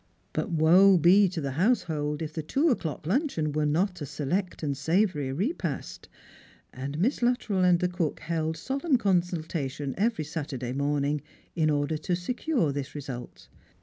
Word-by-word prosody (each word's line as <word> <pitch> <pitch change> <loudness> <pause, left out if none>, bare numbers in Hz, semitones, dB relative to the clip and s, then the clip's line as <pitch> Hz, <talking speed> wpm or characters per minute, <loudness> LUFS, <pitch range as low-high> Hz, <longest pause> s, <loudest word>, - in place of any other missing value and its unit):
But 230 - -2
woe 180 +4 +6
be 185 +4 +6
to 175 -2 -4
the 140 -1 -2
household 155 - 0
if 155 0 -6
the 160 - -3
two 275 - +1
o'clock 160 - -3
luncheon 185 - 0
were 150 0 0
not 180 +3 0
a 145 - -4
select 175 +7 -2
and 140 -2 -1
savoury 160 -2 +1
repast! 170 - -3 0.6
and 135 +3 -5
Miss 230 - +1
Luttrell 240 -6 +1
and 180 -1 +5
the 180 - +1
cook 175 -4 -2
held 160 -1 -2
solemn 270 - 0
consultation 165 - -1
every 225 -6 +1
Saturday 140 -5 -4
morning 145 +1 0 0.3
in 160 -3 +2
order 145 +1 0
to 175 +3 -1
secure 235 - -1
this 140 0 -5
result. 135 -4 -7
160 Hz, 155 wpm, -27 LUFS, 145-190 Hz, 0.6 s, woe